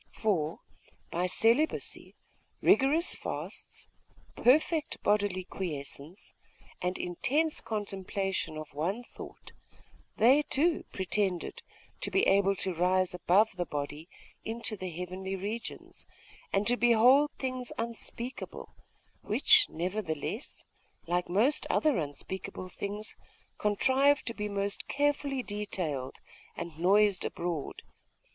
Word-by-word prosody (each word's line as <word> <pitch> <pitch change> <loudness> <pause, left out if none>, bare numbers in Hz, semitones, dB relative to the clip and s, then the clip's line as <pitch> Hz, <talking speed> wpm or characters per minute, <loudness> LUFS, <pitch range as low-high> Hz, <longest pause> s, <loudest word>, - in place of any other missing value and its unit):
For 170 -8 0 0.5
by 180 +2 0
celibacy, 230 - +1 0.4
rigorous 300 +6 +4
fasts, - - -6 0.5
perfect 305 +4 +3
bodily 205 -3 +2
quiescence, 160 -1 -5 0.5
and 180 +1 -1
intense 285 - 0
contemplation 195 -5 -3
of 155 -2 -8
one 180 +11 -2
thought, - - -11 0.7
they, 260 +7 +6
too, 315 +3 +1
pretended 190 -2 0 0.4
to - - -2
be 390 - +3
able 195 0 +4
to 190 - -1
rise 180 +2 +2
above 190 +5 +3
the 175 - -1
body 145 +3 -5 0.3
into 225 0 -3
the 185 -2 -5
heavenly 185 +3 -5
regions, 210 +5 -6 0.4
and 195 +1 +2
to 245 +2 +5
behold 245 +5 +6
things 255 -2 -3
unspeakable, 235 +2 -4 0.5
which 430 -2 +5
nevertheless, 180 - -3 0.4
like 175 +1 -1
most 220 +11 +3
other 300 - +3
unspeakable 185 +5 -5
things, 205 +3 -5 0.4
contrived 265 +7 +3
to 230 - -2
be 210 -2 -3
most 200 0 -2
carefully 280 -2 0
detailed 180 - -3 0.4
and 170 -2 -6
noised 200 +2 +4
abroad.... 170 -4 -4
200 Hz, 105 wpm, -30 LUFS, 180-245 Hz, 0.7 s, they